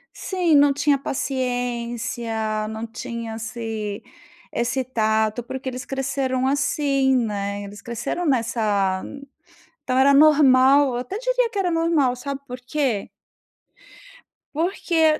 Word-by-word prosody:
Sim, 360 -4 0
não 285 0 +6
tinha 290 +1 +2
paciência, 235 -5 -2
não 220 +1 -5
tinha 230 0 -6
esse 225 -2 -5 0.5
esse 245 +3 0
tato, 220 -2 0
porque 265 +2 -7
eles 255 0 -4
cresceram 270 -1 -1
assim, 275 -1 +2
né. 205 -3 -2
Eles 200 +1 -10
cresceram 245 +8 -4
nessa 220 - +1 0.8
então 255 - -1
era 270 +2 +5
normal. 280 -2 +6
Eu 245 - -2
até 250 +10 -4
diria - - +1
que 425 - -5
era 370 -2 +1
normal, 330 -6 +2
sabe 275 +2 -5
por 250 0 -7
quê? 250 -5 -1 1.4
Porque 325 -1 +1
255 Hz, 120 wpm, -23 LUFS, 225-285 Hz, 1.4 s, não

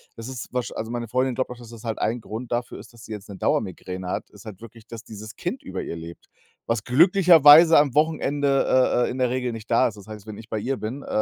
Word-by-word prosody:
das 115 +1 -8
ist 125 -1 -8
wahrsch 125 -1 -2
also, 110 +1 -5
meine 120 -1 -4
Freundin 130 0 0
glaubt 130 - -2
auch, 125 - -8
dass 120 -2 -13
das 115 -1 -12
halt 115 -2 -4
ein 115 +2 -1
Grund 115 +3 -7
dafür 120 +1 -3
ist, - - -14
dass 115 - -15
sie - - -12
jetzt 105 -1 -7
'ne 100 - -8
Dauermigräne 95 -2 -2
hat - - -4
ist 105 +1 -17
halt 105 -1 -10
wirklich, 115 0 -14
dass 115 -1 -9
dieses 110 0 -10
Kind - - -5
über - - -5
ihr - - -6
lebt, 85 +1 -11 0.4
Was 115 -2 -1
glücklicherweise 165 +1 +7
am 145 -3 +3
Wochenende, 140 -5 +2
äh - - -3
äh, - - -3
in 130 - -6
der 125 -1 +1
Regel 125 -1 -2
nicht 115 0 -9
da 115 - +4
ist, 105 -2 -7
das 100 +1 -14
heißt, 105 -1 -10
wenn 105 - -8
ich 110 0 -13
bei 110 - -2
ihr 130 +4 -2
bin, 125 +6 -6
äh - - -13
120 Hz, 265 wpm, -23 LUFS, 110-130 Hz, 0.4 s, glücklicherweise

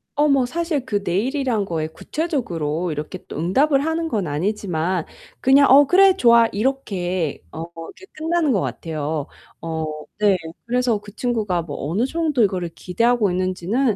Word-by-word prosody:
어 295 +1 +3
뭐 275 -3 +3
사실 315 -1 -2
그 205 -1 0
내일이란 235 - 0
거에 160 -3 -2
구체적으로 175 - -3
이렇게 150 0 -5
또 - - -7
응답을 275 - +2
하는 325 0 -1
건 200 -7 -1
아니지만 175 +1 -1 0.3
그냥 275 +2 +5
"어 280 +1 +8
그래. 380 +2 +5
좋아." 235 -4 +6
이렇게 190 - -2
어 160 - -6
이렇게 165 - -10
끝나는 320 -1 0
것 200 - +2
같아요. 155 -2 -3 0.3
어 160 -1 -3 0.3
네. 205 -2 +4 0.3
그래서 245 -2 +1
그 205 +1 -14
친구가 215 -8 -1
뭐 145 -2 -5
어느 215 +9 +1
정도 300 -5 +1
이거를 180 -4 0
기대하고 230 +1 +1
있는지는 185 +6 0
210 Hz, 325 characters per minute, -21 LUFS, 175-270 Hz, 0.3 s, 어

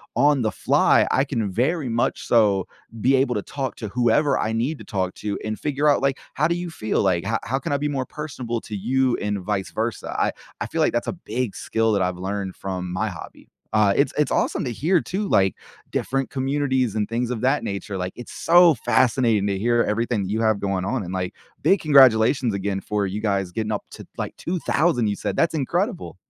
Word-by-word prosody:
on 140 +3 +4
the 110 -2 0
fly, - - +3
I 135 - +2
can 115 -8 -2
very 135 - 0
much 115 +1 -1
so 100 -5 +3 0.3
be 135 +4 +4
able 130 -1 +1
to 105 - -1
talk 135 -3 -4
to 110 - -5
whoever 125 +5 +2
I 110 - -1
need 125 +7 -1
to - - -9
talk 95 -3 -2
to 105 -1 -3
and 110 0 -4
figure 150 0 0
out, 145 - +4
like, 135 0 +1 0.2
"How 150 +3 +2
do 170 - 0
you 175 -1 -5
feel?" 110 -9 -1
Like, 90 -3 +1
"How 110 +3 0
how 135 +2 -1
can 140 - -4
I 140 - +2
be 150 +1 -1
more 135 -3 -2
personable 125 -6 -5
to 105 - -7
you 130 +5 +1
and 105 -1 -2
vice 95 0 -2
versa?" 115 +1 -3
I - - +2 0.3
I - - -2
feel - - -2
like - - +2
that's 120 - -1
a - - -1
big 125 - -4
skill 115 0 0
that 100 - +1
I've 90 -1 -1
learned 95 +1 -4
from 90 -2 -5
my 110 +3 0
hobby. 90 -5 -11 0.2
Uh, 105 -2 +4
it's 140 - +2
it's 150 - +1
awesome - - 0
to 125 - -2
hear 165 - +1
too, 200 +3 -3
like, 95 - +3 0.4
different 135 0 -1
communities 130 -4 0
and 105 -1 -1
things 120 +1 -1
of 120 -3 -3
that 130 +4 +2
nature, 100 0 -4
like, 90 0 -4
it's 120 - -9
so 175 -1 +5
fascinating 115 -6 +2
to 100 -1 -1
hear 120 +2 +2
everything 115 -1 0
that 95 - -4
you 110 +2 -1
have 110 -2 +1
going 95 -2 -1
on, 120 +2 -1
and, 90 +1 -6
like, 90 -1 -3 0.3
big 195 - +3
congratulations 130 -4 +5
again 100 0 -2
for 105 0 -1
you 100 +2 -3
guys 100 -4 -1
getting 110 +3 -2
up 105 - -3
to, - - -10
like, - - -4
2,000 165 -7 0
you 100 - 0
said, - - -3
that's 165 - +2
incredible. 175 - -2
115 Hz, 225 wpm, -23 LUFS, 100-135 Hz, 0.4 s, so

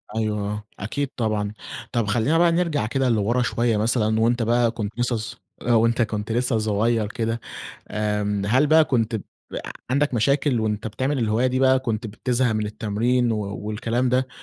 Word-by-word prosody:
أيوه، 110 -1 0
آه، 105 0 -5 0.2
أكيد 135 +8 -2
طبعًا. 105 -2 -1 0.4
طب 115 -3 0
خلّينا 120 +10 +2
بقى 170 0 +4
نرجع 165 -9 +1
كده 130 +2 0
لورا 115 +2 +1
شويّة 120 -2 +1
مثلًا، 110 0 +1
وأنت 115 +1 +2
بقى 120 0 +2
كنت 110 0 -5
لسّه 120 0 +1
ص 120 +2 -6 0.2
آآ، 120 - +1
وأنت 115 +1 +3
كنت 105 0 -2
لسّه 120 0 +1
صغيّر 110 +1 +1
كده، 115 +1 -2 0.5
آمم، 105 -1 -1
هل 130 +7 +3
بقى 155 +1 +6
كنت 115 -5 0 0.7
عندك 140 0 +1
مشاكل 130 +1 +2
وأنت 110 0 -2
بتعمل 130 +6 -1
الهواية 115 +2 +1
دي 130 0 0
بقى 130 0 +4
كنت 115 -3 -3
بتزهق 120 +3 0
من 110 -1 -1
التمرين 115 +3 0
و 110 - -1 0.3
والكلام 115 +4 -1
ده، 130 +1 +1
115 Hz, 170 wpm, -23 LUFS, 110-125 Hz, 0.7 s, بقى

